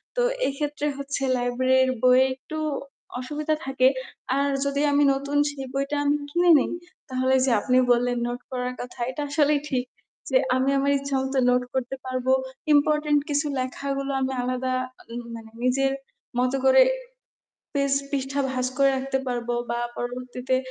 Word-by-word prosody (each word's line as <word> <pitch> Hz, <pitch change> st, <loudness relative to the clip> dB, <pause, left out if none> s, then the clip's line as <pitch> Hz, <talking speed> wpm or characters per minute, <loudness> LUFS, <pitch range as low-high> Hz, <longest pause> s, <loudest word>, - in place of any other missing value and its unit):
তো -, -, +1 dB, 0.2 s
এই -, -, +1 dB
ক্ষেত্রে 295 Hz, 0 st, -2 dB
হচ্ছে, 280 Hz, 0 st, -3 dB
লাইব্রেরীর 255 Hz, +1 st, +2 dB
বইয়ে 255 Hz, +1 st, +6 dB
একটু 310 Hz, +4 st, -8 dB, 0.6 s
অসুবিধা 300 Hz, +4 st, -2 dB
থাকে। 265 Hz, -1 st, +3 dB, 0.5 s
আর 280 Hz, 0 st, +2 dB, 0.2 s
যদি 280 Hz, 0 st, 0 dB
আমি 285 Hz, 0 st, +4 dB
নতুন 280 Hz, +1 st, -2 dB
সেই 270 Hz, -2 st, -7 dB
বইটা 275 Hz, +2 st, -1 dB
আমি 290 Hz, -, +3 dB, 0.2 s
কিনে 345 Hz, +2 st, +4 dB
নিই, -, -, -1 dB, 0.4 s
তাহলে 260 Hz, 0 st, +2 dB
যে 260 Hz, -, +2 dB
আপনি 255 Hz, 0 st, +2 dB
বললেন 245 Hz, 0 st, +2 dB
নোট 245 Hz, 0 st, -4 dB
করার 250 Hz, 0 st, -2 dB
কথা 245 Hz, +1 st, -9 dB
এটা 295 Hz, -, -5 dB
আসলেই 295 Hz, 0 st, +3 dB
ঠিক। 255 Hz, -2 st, 0 dB, 0.4 s
যে -, -, +4 dB, 0.2 s
আমি 260 Hz, +1 st, +2 dB
আমার 280 Hz, +1 st, +2 dB
ইচ্ছামতো 270 Hz, -1 st, -1 dB
নোট 250 Hz, 0 st, +3 dB
করতে 260 Hz, 0 st, -2 dB
পারবো। 255 Hz, 0 st, -1 dB, 0.4 s
ইম্পোর্টেন্ট 300 Hz, 0 st, +3 dB
কিছু 290 Hz, +1 st, +1 dB
লেখাগুলো 275 Hz, +2 st, -3 dB
আমি 265 Hz, 0 st, 0 dB
আলাদা 255 Hz, +1 st, -1 dB, 0.4 s
উম 240 Hz, -, -4 dB
মানে 225 Hz, -1 st, -11 dB
নিজের 270 Hz, +2 st, +2 dB, 0.5 s
মতো 255 Hz, +2 st, +1 dB
করে 265 Hz, -, +7 dB, 0.9 s
পেজ 280 Hz, -1 st, +1 dB, 0.2 s
পৃষ্ঠা 275 Hz, 0 st, -1 dB
ভাজ 255 Hz, -1 st, -1 dB
করে 275 Hz, 0 st, +5 dB
রাখতে 265 Hz, 0 st, -1 dB
পারবো। 240 Hz, -1 st, -2 dB, 0.2 s
বা 235 Hz, -, -1 dB, 0.2 s
পরবর্তীতে 250 Hz, +1 st, -2 dB
265 Hz, 155 wpm, -25 LUFS, 255-280 Hz, 0.9 s, করে